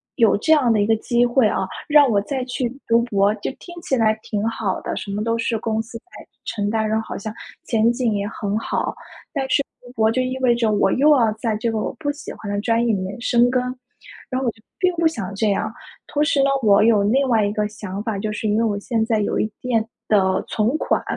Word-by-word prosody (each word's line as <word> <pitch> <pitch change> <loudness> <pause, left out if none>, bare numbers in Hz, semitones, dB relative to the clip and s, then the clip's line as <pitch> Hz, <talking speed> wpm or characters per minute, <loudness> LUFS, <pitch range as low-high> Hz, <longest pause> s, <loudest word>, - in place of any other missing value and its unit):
有 225 -5 +4
这 315 +9 +3
样 260 -6 +3
的 215 - +3
一 205 - +3
个 225 +1 +3
机 240 +2 +1
会 240 -2 +3
啊， 190 - -1 0.2
让 290 -2 +7
我 205 -4 +2
再 255 +3 -3
去 250 -1 -2 0.2
读 230 +1 +4
博 205 -2 +2
就 205 - -4
听 345 - -12
起 265 - 0
来 220 -2 +3
挺 210 0 -2
好 210 -4 -2
的， - - -4
什 200 - -6
么 210 +1 -2
都 230 0 0
是 230 0 0
公 220 0 -1
司 230 +1 -9
在 - - -18 0.4
承 205 -2 -2
担， 220 0 0
然 220 - 0
后 - - -9
好 - - -5
像 215 +2 -6 0.3
前 230 0 +3
景 240 -3 0
也 200 0 -1
很 205 -2 -3
好。 - - -2 0.4
但 275 -2 -1
是 280 - +3 0.2
读 245 - -13
博 220 -2 +2
就 255 +2 +1
意 255 +1 -2
味 245 -2 +4
着 230 -2 +1
我 205 - +2
又 290 +4 +4
要 225 -3 +3
在 220 -1 -2
这 230 +1 -1
个 220 - -1
我 - - -2
不 290 -2 -1
喜 290 - -9
欢 205 -2 -7
的 205 - -1
专 230 +1 +1
业 230 - +2
里 190 - -1
面 195 +5 -5
深 240 0 +3
耕， 250 0 +1 0.7
然 255 - -1
后 265 - -2
我 235 - +1
就 220 - -24 0.2
并 365 -1 +2
不 330 -1 +4
想 200 - -4
这 215 0 +1
样。 215 +2 -1 0.3
同 295 +1 0
时 285 -2 +2
呢， 275 - +3
我 210 -1 +5
有 220 -3 +4
另 265 +7 +2
外 220 -3 +3
一 205 - 0
个 210 0 0
想 205 -1 -6
法， 220 -2 -2
就 215 +1 -2
是 215 +1 -3
因 210 - +1
为 - - +2
我 205 -3 0
现 225 +1 -1
在 220 -2 +1
有 - - -1
一定 225 +1 -1 0.2
的 190 -3 +2
存 230 +7 0
款。 - - 0
225 Hz, 280 characters per minute, -21 LUFS, 210-245 Hz, 0.7 s, 让